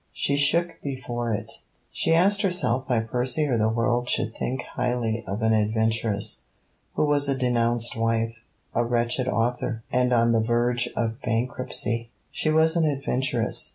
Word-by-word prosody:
She 140 Hz, -, 0 dB
shook 165 Hz, +4 st, +2 dB
before 120 Hz, -4 st, -4 dB
it. 105 Hz, -, -3 dB, 0.4 s
She -, -, 0 dB
asked 200 Hz, +4 st, +4 dB
herself 155 Hz, -, +1 dB
why 120 Hz, -4 st, +1 dB
Percy 125 Hz, +6 st, 0 dB
or 135 Hz, -4 st, 0 dB
the 110 Hz, -1 st, +2 dB
world 120 Hz, +2 st, 0 dB
should 115 Hz, 0 st, -1 dB
think 130 Hz, +1 st, -3 dB
highly 120 Hz, -2 st, -2 dB
of 100 Hz, +3 st, -3 dB
an 110 Hz, 0 st, +3 dB
adventuress, 110 Hz, -1 st, +1 dB, 0.5 s
who -, -, +2 dB
was 145 Hz, -1 st, +1 dB
a 135 Hz, -, 0 dB
denounced 120 Hz, -2 st, +1 dB
wife, 115 Hz, 0 st, 0 dB, 0.4 s
a 120 Hz, -, +1 dB
wretched 120 Hz, +2 st, 0 dB
author, 120 Hz, -1 st, -1 dB
and 125 Hz, 0 st, +2 dB
on 115 Hz, -1 st, +3 dB
the 115 Hz, -1 st, +3 dB
verge 120 Hz, +1 st, +1 dB
of 115 Hz, -1 st, -2 dB
bankruptcy. 115 Hz, 0 st, -1 dB, 0.2 s
She 155 Hz, -, -1 dB
was 160 Hz, +2 st, +3 dB
an 160 Hz, -2 st, +2 dB
adventuress. 130 Hz, -4 st, 0 dB
120 Hz, 155 wpm, -25 LUFS, 115-130 Hz, 0.5 s, asked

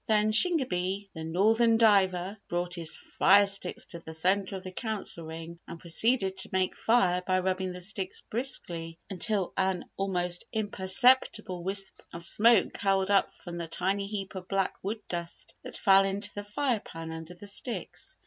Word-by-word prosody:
Then 215 Hz, -1 st, +3 dB
Shingebis, 200 Hz, -, +2 dB
"The 160 Hz, -, -7 dB
Northern 220 Hz, +8 st, +3 dB
Diver," 195 Hz, -3 st, +3 dB
brought 175 Hz, 0 st, -2 dB
his 165 Hz, -3 st, -2 dB
fire 200 Hz, +1 st, +4 dB
sticks 195 Hz, -2 st, -3 dB
to 170 Hz, -, -6 dB
the 160 Hz, -1 st, -9 dB
centre 190 Hz, +4 st, 0 dB
of 190 Hz, -, -7 dB
the 185 Hz, -, -7 dB
Council 200 Hz, -5 st, -4 dB
Ring 165 Hz, +1 st, -8 dB
and 170 Hz, -, -8 dB
proceeded 190 Hz, +3 st, +1 dB
to -, -, -3 dB
make 185 Hz, -1 st, 0 dB
fire 185 Hz, -6 st, +2 dB
by 185 Hz, 0 st, 0 dB
rubbing 185 Hz, 0 st, -1 dB
the 180 Hz, 0 st, -8 dB
sticks 190 Hz, 0 st, -3 dB
briskly 170 Hz, -9 st, -1 dB
until 195 Hz, +1 st, -1 dB
an 190 Hz, -2 st, 0 dB
almost 180 Hz, -2 st, -2 dB
imperceptible 210 Hz, -2 st, +2 dB
wisp 195 Hz, +1 st, -1 dB
of 170 Hz, -, -5 dB
smoke 225 Hz, +3 st, +4 dB
curled 195 Hz, 0 st, +1 dB
up 200 Hz, -, +3 dB
from 175 Hz, -1 st, -6 dB
the 170 Hz, -, -4 dB
tiny 195 Hz, +4 st, -1 dB
heap 200 Hz, -2 st, -5 dB
of 185 Hz, -1 st, -7 dB
black 195 Hz, -1 st, 0 dB
wood 215 Hz, +3 st, -4 dB
dust 170 Hz, -1 st, -6 dB
that -, -, -8 dB
fell 195 Hz, 0 st, +5 dB
into 200 Hz, +2 st, -1 dB
the 205 Hz, -, -5 dB
fire 240 Hz, +2 st, 0 dB
pan 165 Hz, -4 st, -8 dB
under 160 Hz, +2 st, -8 dB
the 185 Hz, -, -12 dB
sticks. 225 Hz, +4 st, -5 dB
190 Hz, 170 wpm, -29 LUFS, 180-205 Hz, -, fell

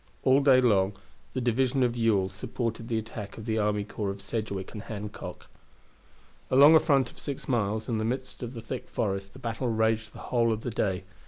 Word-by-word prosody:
All 130 Hz, +1 st, +5 dB
day 135 Hz, -2 st, +6 dB
long 100 Hz, -5 st, +3 dB, 0.4 s
the 130 Hz, -, -1 dB
division 130 Hz, +2 st, +2 dB
of 120 Hz, -1 st, +1 dB
Ewell 110 Hz, -5 st, +2 dB
supported 115 Hz, +4 st, -4 dB
the 115 Hz, -2 st, 0 dB
attack 110 Hz, -2 st, -6 dB
of 110 Hz, -, -8 dB
the 110 Hz, -1 st, 0 dB
army 105 Hz, -1 st, +1 dB
corps 105 Hz, 0 st, -4 dB
of 100 Hz, +1 st, -5 dB
Sedgwick 100 Hz, -1 st, -4 dB
and 105 Hz, -, -6 dB
Hancock. 105 Hz, -1 st, -7 dB, 1.0 s
Along 140 Hz, +4 st, +8 dB
a 160 Hz, -, +9 dB
front 140 Hz, -5 st, +2 dB
of -, -, -12 dB
six 140 Hz, -2 st, -5 dB
miles, 110 Hz, -3 st, 0 dB
in 115 Hz, -3 st, 0 dB
the -, -, -1 dB
midst 130 Hz, +3 st, -3 dB
of 120 Hz, +1 st, -5 dB
the 115 Hz, -, -7 dB
thick 120 Hz, +2 st, -6 dB
forest, 100 Hz, -2 st, -2 dB
the -, -, -12 dB
battle 115 Hz, +2 st, -3 dB
raged 110 Hz, -1 st, +1 dB
the -, -, -11 dB, 0.2 s
whole 115 Hz, -2 st, +4 dB
of 110 Hz, 0 st, -2 dB
the 120 Hz, -, -3 dB
day. 95 Hz, -3 st, -1 dB
115 Hz, 210 wpm, -28 LUFS, 105-125 Hz, 1.0 s, a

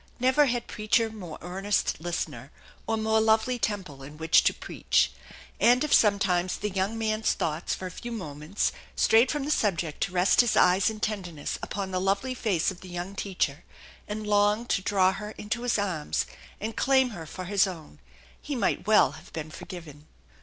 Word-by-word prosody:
Never 260 Hz, +4 st, +4 dB
had 240 Hz, -1 st, -1 dB
preacher 225 Hz, +1 st, 0 dB
more 180 Hz, -8 st, -8 dB
earnest 190 Hz, -1 st, -1 dB
listener, 150 Hz, -6 st, -4 dB, 0.4 s
or 225 Hz, -, 0 dB
more 220 Hz, 0 st, +2 dB
lovely 220 Hz, +3 st, +2 dB
temple 185 Hz, -12 st, -3 dB
in 145 Hz, +3 st, -10 dB
which 160 Hz, +1 st, +4 dB
to -, -, +5 dB
preach. -, -, 0 dB, 0.5 s
And 245 Hz, +3 st, +5 dB
if 300 Hz, -, 0 dB
sometimes 190 Hz, -4 st, +3 dB
the 210 Hz, 0 st, -3 dB
young 195 Hz, +4 st, -1 dB
man's 220 Hz, 0 st, +1 dB
thoughts 160 Hz, +2 st, -2 dB
for 185 Hz, -, -7 dB
a 185 Hz, -, -5 dB
few 240 Hz, +6 st, -7 dB
moments 160 Hz, -3 st, -2 dB, 0.2 s
strayed 230 Hz, +3 st, +4 dB
from 295 Hz, -2 st, -1 dB
the 300 Hz, -, -1 dB
subject 175 Hz, -, 0 dB
to 195 Hz, -, 0 dB
rest 180 Hz, +4 st, +4 dB
his 240 Hz, -, +1 dB
eyes 180 Hz, +2 st, +5 dB
in 215 Hz, -1 st, -7 dB
tenderness 180 Hz, -8 st, -3 dB
upon 195 Hz, -2 st, -4 dB
the 185 Hz, 0 st, -1 dB
lovely 200 Hz, +7 st, 0 dB
face 200 Hz, -9 st, 0 dB
of 180 Hz, -, -12 dB
the 185 Hz, -, -11 dB
young 175 Hz, +2 st, -5 dB
teacher, 175 Hz, -7 st, -2 dB, 0.4 s
and 215 Hz, +1 st, -4 dB
long 210 Hz, +2 st, +2 dB
to 195 Hz, -, +1 dB
draw 190 Hz, -1 st, +3 dB
her 210 Hz, +2 st, -7 dB
into 220 Hz, +3 st, -3 dB
his 245 Hz, -2 st, +1 dB
arms 185 Hz, -7 st, -1 dB, 0.3 s
and 220 Hz, +2 st, -4 dB
claim 265 Hz, -1 st, +3 dB
her 165 Hz, -6 st, -8 dB
for 185 Hz, +4 st, -7 dB
his 200 Hz, +1 st, +3 dB
own, 160 Hz, -, -9 dB, 0.4 s
he -, -, -4 dB
might -, -, 0 dB
well -, -, +5 dB
have -, -, -13 dB
been 155 Hz, 0 st, -5 dB
forgiven. 155 Hz, -5 st, -10 dB
200 Hz, 185 wpm, -27 LUFS, 175-220 Hz, 0.5 s, to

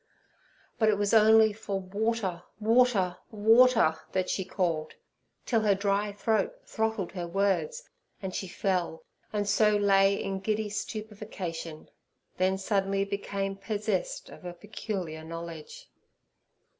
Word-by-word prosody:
But 220 Hz, -2 st, +4 dB
it 210 Hz, -, +3 dB
was 205 Hz, +1 st, 0 dB
only 220 Hz, 0 st, +6 dB
for 200 Hz, -2 st, -4 dB
'Water, 200 Hz, -1 st, -2 dB, 0.2 s
water, 220 Hz, -5 st, +3 dB
water!' 225 Hz, -4 st, +5 dB
that 185 Hz, -1 st, 0 dB
she 190 Hz, -, -1 dB
called, 170 Hz, -4 st, -2 dB, 0.5 s
till 230 Hz, -3 st, +2 dB
her 205 Hz, -2 st, +3 dB
dry 200 Hz, +1 st, 0 dB
throat 210 Hz, 0 st, 0 dB
throttled 220 Hz, -4 st, -2 dB
her 175 Hz, -3 st, -5 dB
words, 200 Hz, -, 0 dB, 0.3 s
and 190 Hz, -3 st, -5 dB
she 190 Hz, -, -3 dB
fell, 180 Hz, -3 st, -2 dB, 0.3 s
and 205 Hz, -1 st, -1 dB
so 210 Hz, +1 st, +4 dB
lay 195 Hz, -1 st, +4 dB
in 195 Hz, -1 st, -3 dB
giddy 215 Hz, +2 st, -1 dB
stupefaction, 205 Hz, -7 st, -6 dB, 0.5 s
then 185 Hz, +1 st, +2 dB
suddenly 195 Hz, 0 st, 0 dB
became 200 Hz, 0 st, -3 dB
possessed 220 Hz, -, -3 dB
of -, -, -13 dB
a 175 Hz, -1 st, -6 dB
peculiar 185 Hz, -4 st, -5 dB
knowledge. 165 Hz, -, -8 dB
200 Hz, 125 wpm, -29 LUFS, 185-220 Hz, 0.5 s, only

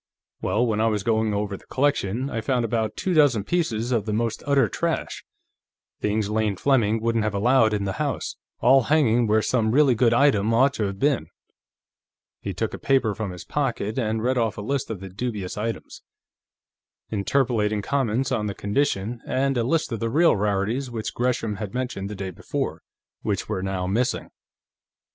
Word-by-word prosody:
Well, 105 Hz, +6 st, +1 dB
when 110 Hz, -2 st, 0 dB
I 115 Hz, -, +3 dB
was 105 Hz, -3 st, 0 dB
going 110 Hz, -2 st, +1 dB
over 100 Hz, -1 st, -2 dB
the -, -, -14 dB
collection, 130 Hz, -3 st, 0 dB
I 115 Hz, -, -2 dB
found 125 Hz, 0 st, 0 dB
about 110 Hz, -2 st, -1 dB
two 185 Hz, -, -1 dB
dozen 145 Hz, -, +4 dB
pieces 120 Hz, -, -1 dB
of 115 Hz, -3 st, 0 dB
the 105 Hz, -, -1 dB
most 115 Hz, +1 st, -1 dB
utter 140 Hz, -1 st, +4 dB
trash, 170 Hz, -1 st, -2 dB, 0.8 s
things 105 Hz, 0 st, 0 dB
Lane 105 Hz, -1 st, 0 dB
Fleming 115 Hz, -2 st, +2 dB
wouldn't 115 Hz, 0 st, 0 dB
have 110 Hz, -1 st, -1 dB
allowed 115 Hz, +2 st, +4 dB
in 105 Hz, -1 st, -1 dB
the 95 Hz, -1 st, -2 dB
house, -, -, -2 dB, 0.3 s
all 130 Hz, 0 st, +5 dB
hanging 120 Hz, -6 st, +3 dB
where 110 Hz, 0 st, +3 dB
some 115 Hz, -4 st, +1 dB
really 135 Hz, +2 st, +4 dB
good 115 Hz, 0 st, +3 dB
item 115 Hz, -4 st, +3 dB
ought 135 Hz, +3 st, +4 dB
to 110 Hz, -6 st, -1 dB
have 100 Hz, -1 st, -4 dB
been." 135 Hz, -, +1 dB, 1.1 s
He 100 Hz, -, -4 dB
took 100 Hz, +4 st, -3 dB
a -, -, -6 dB
paper 130 Hz, -6 st, +2 dB
from 110 Hz, -1 st, -4 dB
his 90 Hz, -1 st, -8 dB
pocket 125 Hz, -5 st, -2 dB
and 110 Hz, -2 st, -1 dB
read 125 Hz, +1 st, +1 dB
off 115 Hz, -3 st, 0 dB
a -, -, -4 dB
list 135 Hz, +4 st, -2 dB
of 105 Hz, -5 st, -5 dB
the 95 Hz, -, -7 dB
dubious 100 Hz, -1 st, -4 dB
items, 110 Hz, +2 st, -5 dB, 1.1 s
interpolating 110 Hz, -1 st, +1 dB
comments 135 Hz, -1 st, 0 dB
on 110 Hz, -5 st, 0 dB
the 100 Hz, -, -4 dB
condition, 115 Hz, 0 st, -1 dB
and 135 Hz, +1 st, +1 dB
a 120 Hz, -, +1 dB
list 155 Hz, +6 st, 0 dB
of 115 Hz, -, -2 dB
the 115 Hz, -, -1 dB
real 165 Hz, +8 st, +4 dB
rarities 105 Hz, +6 st, -1 dB
which 115 Hz, -2 st, -4 dB
Gresham 120 Hz, -4 st, -1 dB
had 105 Hz, 0 st, -6 dB
mentioned 125 Hz, -6 st, -3 dB
the 105 Hz, -, -6 dB
day 95 Hz, -1 st, -5 dB
before, -, -, -4 dB, 0.4 s
which 105 Hz, -2 st, -2 dB
were 105 Hz, -3 st, -2 dB
now 95 Hz, -1 st, -2 dB
missing. 120 Hz, +7 st, -1 dB
115 Hz, 185 wpm, -24 LUFS, 105-130 Hz, 1.1 s, all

